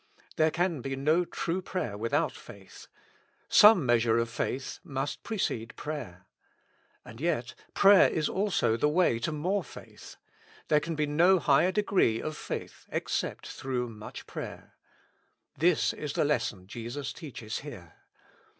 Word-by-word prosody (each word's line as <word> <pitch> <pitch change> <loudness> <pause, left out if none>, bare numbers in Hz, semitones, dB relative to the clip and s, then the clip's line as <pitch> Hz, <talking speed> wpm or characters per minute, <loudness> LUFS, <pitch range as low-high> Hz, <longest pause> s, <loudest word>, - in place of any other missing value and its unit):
There 155 0 +3
can 175 -3 -1
be 135 +2 -3
no 155 +6 +2
true 170 +2 -3
prayer 180 - -3
without 135 +8 0
faith; 100 -2 -13 0.6
some 210 -8 +7
measure 115 -1 +3
of 115 0 0
faith 130 +2 -3
must 140 -4 -4
precede 120 - -3
prayer. 125 - -6 0.8
And 115 +4 -11
yet 150 -7 -1 0.2
prayer 200 -1 +7
is 155 -2 0
also 190 - +1
the 150 +6 +2
way 150 -7 +2
to 155 - -2
more 180 +7 -1
faith; - - -12 0.5
there 150 - +5
can 165 +2 -4
be 150 0 +1
no 170 +6 +4
higher 170 +2 +3
degree 185 - +2
of 155 +4 -4
faith - - -7
except - - -2
through 125 -2 -3
much 110 -1 -9
prayer. - - -8 0.8
This 170 0 +2
is 150 -2 -5
the - - +1
lesson 120 -9 -1
Jesus 120 +7 -6
teaches 120 -9 -6
here. 105 - -10
145 Hz, 140 wpm, -29 LUFS, 115-170 Hz, 0.8 s, some